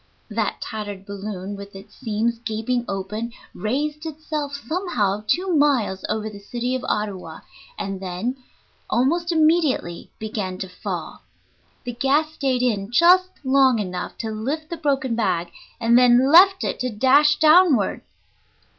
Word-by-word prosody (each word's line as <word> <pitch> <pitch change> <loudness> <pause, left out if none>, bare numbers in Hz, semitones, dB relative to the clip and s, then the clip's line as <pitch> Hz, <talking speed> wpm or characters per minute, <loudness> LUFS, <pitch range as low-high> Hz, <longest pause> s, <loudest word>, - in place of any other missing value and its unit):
That 215 -1 -2
tattered 205 -3 -6
balloon, 200 -1 -6
with 200 0 -10
its 200 +2 -12
seams 230 -1 -2
gaping 235 +2 -2
open, 210 +4 -4 0.2
raised 295 +7 -2
itself 305 -2 -4
somehow 235 - -1
two 360 - +1
miles 255 -10 +2
over 215 0 -2
the 210 -2 -8
city 240 +5 -3
of 260 - -2
Ottawa, 205 -3 -3 0.4
and 195 -1 -4
then 190 +8 -3 0.5
almost 335 +8 +1
immediately 310 - +1
began 205 -4 -4
to 190 - -5
fall. 185 - -6 0.6
The 245 - -5
gas 285 +6 +1
stayed 260 -4 0
in 205 -5 0
just 360 +8 +5
long 265 -2 +4
enough 185 -4 -4
to 225 -1 -4
lift 285 +10 -4
the 340 - -3
broken 275 -5 0
bag, 175 -7 -1 0.3
and 230 +1 +3
then 250 +2 +5
left 380 +3 +7
it - - -2
to 255 - -1
dash 270 +7 +4
downward. 310 - +4
240 Hz, 140 wpm, -22 LUFS, 205-295 Hz, 0.6 s, left